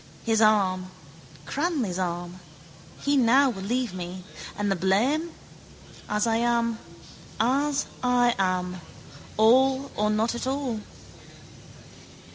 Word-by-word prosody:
His 225 -1 +2
arm: 190 -4 +3 0.6
Cranly's 275 - -1
arm. 175 0 -4 0.6
He 285 0 +1
now 265 +1 +4
will 195 - -7
leave 240 +1 -1
me. 180 0 -6 0.3
And 205 -1 0
the - - +2
blame? 230 - +1 0.8
As 210 +1 +1
I 225 -1 +1
am. 235 -1 +1 0.6
As 275 +4 +1 0.2
I 245 -1 +3
am. 185 -1 -1 0.6
All 260 +5 +4
or 210 0 +1
not 215 +2 +1
at 240 +2 -4
all. 265 -4 -2
225 Hz, 110 wpm, -26 LUFS, 190-260 Hz, 0.8 s, now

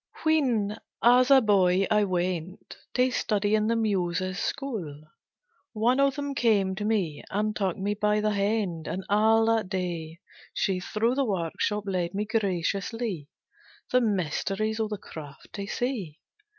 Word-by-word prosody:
When, 245 -10 +1 0.2
as 250 +2 +6
a 270 -1 +7
boy, 195 -3 +3
I 210 -1 +4
went 180 -1 -3 0.2
To 255 0 +3
study 210 -3 0
in 215 0 +2
the 230 - +2
Muses' 185 -4 -1
school, 215 - -4 0.7
One 240 +4 +2
of 275 -1 +3
them 285 -1 -3
came 210 -7 +2
to 205 +2 -4
me, 195 -9 -1
and 210 +1 -1
took 190 -4 -1
Me 200 +2 -1
by 210 0 +1
the 215 0 +1
hand, 200 -5 -1
and 190 - -3
all 220 +2 +4
that 225 -4 +1
day, 170 -4 -3 0.4
She 190 -2 0
through 220 +6 0
the 275 +1 +1
work 185 -9 -2
shop 210 0 0
led 180 -2 -2
me 210 +1 -1
graciously, 200 -3 -2 0.6
The 250 -1 +4
mysteries 210 +2 -1
of 220 -1 0
the 210 - -3
craft 145 -6 -11
to 200 -1 -5
see. 215 - -3
205 Hz, 155 wpm, -27 LUFS, 185-225 Hz, 0.7 s, a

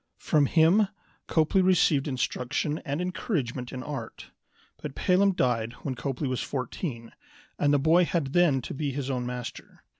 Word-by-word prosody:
From 145 -2 +2
him 170 +8 +4 0.4
Copley 160 +4 +3
received 170 -6 +3
instruction 135 +3 -1
and 140 +3 -3
encouragement 145 - -3
in 130 -1 -6
art. 145 -1 -7 0.5
But 145 -3 -6
Pelham 195 +1 +3
died 120 -7 0
when 135 - -2
Copley 135 +2 -3
was 130 -1 -1
fourteen, 125 -2 -4 0.5
and 145 - +3
the 145 - +5
boy 160 +5 +4
had 155 -6 -2
then 155 -8 +3
to - - -5
be 140 0 -2
his 135 0 -3
own 125 -2 -2
master. 125 -1 -7
140 Hz, 155 wpm, -27 LUFS, 125-165 Hz, 0.5 s, the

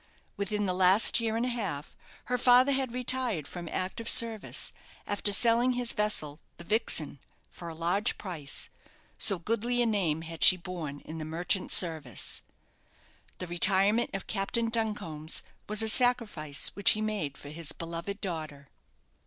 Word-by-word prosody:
Within 205 +1 -2
the 185 - 0
last 190 +6 +5
year 225 -1 -2
and 235 - -1
a - - -1
half 195 -12 -5 0.3
her 250 - -1
father 250 +2 +5
had 265 -2 -1
retired 250 - -2
from 175 -2 -8
active 190 +5 -3
service, 230 -4 +4 0.3
after 205 0 0
selling 235 +4 +3
his 245 -1 0
vessel, 160 -8 -2 0.2
the 170 - -10
"Vixen," 170 - -2 0.3
for 170 - -9
a 165 - -9
large 180 +7 0
price, 160 -8 -6 0.5
so 200 -4 +3
goodly 230 +6 -2
a 240 - +3
name 180 -8 -1
had 165 0 -5
she 185 - +9
borne 170 -5 -7
in 160 +1 -9
the - - -5
merchant 170 +4 -2
service. 155 - 0 1.0
This 180 - -6
retirement 195 +6 +3
of 195 - -5
Captain 225 +3 -1
Duncombe's 205 -9 -2 0.3
was 215 +1 +3
a - - 0
sacrifice 220 - +2
which 200 - +3
he 215 - -4
made 205 -10 -3
for 145 - -11
his 155 0 -3
beloved 170 +4 -6
daughter. 155 -7 -6
195 Hz, 155 wpm, -28 LUFS, 165-230 Hz, 1.0 s, she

